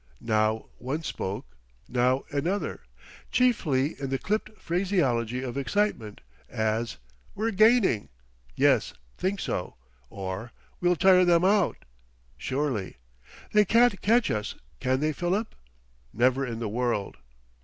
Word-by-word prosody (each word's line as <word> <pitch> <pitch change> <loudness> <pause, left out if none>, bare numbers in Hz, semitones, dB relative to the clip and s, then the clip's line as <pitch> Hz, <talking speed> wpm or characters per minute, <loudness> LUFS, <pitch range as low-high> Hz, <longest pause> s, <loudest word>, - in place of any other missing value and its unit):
Now 110 0 +1
one 140 +6 -3
spoke, 100 -2 -4 0.4
now 125 +2 +1
another 170 +8 -1 0.5
chiefly 155 - +1
in 135 - -2
the 135 - 0
clipped 215 +7 -3
phraseology, 135 - 0
of 130 +1 -3
excitement. 140 - -1 0.3
As 110 +2 -1 0.4
"We're 225 +2 0
gaining?" 215 - +4 0.5
"Yes - - +3 0.2
think 195 +2 -1
so." 90 - -3 0.3
Or, 95 +4 -6 0.3
"We'll 175 0 +3
tire 185 +1 +6
them 175 0 +4
out?" 195 -2 +2 0.5
"Sure 145 +2 -1
ly." 100 -6 -4 0.6
"They 210 0 +6
can't 230 0 +3
catch 230 +3 +3
us, 105 -1 -3 0.2
can 130 +1 0
they, 155 0 +1
Philip?" 185 +7 -1 0.6
"Never 130 +3 +2
in 115 -2 -4
the 115 -1 -3
world." 115 -2 -2
140 Hz, 120 wpm, -27 LUFS, 115-195 Hz, 0.6 s, tire